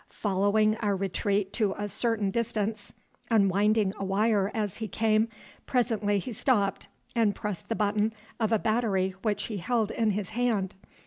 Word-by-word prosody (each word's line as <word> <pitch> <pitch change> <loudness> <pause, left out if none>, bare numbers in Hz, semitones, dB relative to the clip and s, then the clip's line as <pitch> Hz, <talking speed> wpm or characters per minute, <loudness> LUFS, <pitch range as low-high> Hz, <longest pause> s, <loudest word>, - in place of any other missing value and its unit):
Following 210 +2 +2
our 205 -3 0
retreat 195 +1 -1
to 210 -4 +1
a 205 - -2
certain 215 -2 0
distance, 215 -1 -2 0.4
unwinding 205 -1 +3
a - - -2
wire 200 +1 +2
as 210 -4 -2
he 225 - -3
came, 220 +1 +2 0.4
presently 220 -5 +1
he 230 +6 -4
stopped 215 -4 +1 0.3
and 220 -4 +3
pressed 210 -4 -5
the 225 - 0
button 210 +1 +1 0.3
of 220 -1 +1
a 225 - +5
battery 205 -4 +1
which 210 -2 0
he 215 - -4
held 220 +3 0
in 225 -2 +1
his 205 -1 -2
hand. 220 -5 0
210 Hz, 155 wpm, -28 LUFS, 200-225 Hz, 0.4 s, a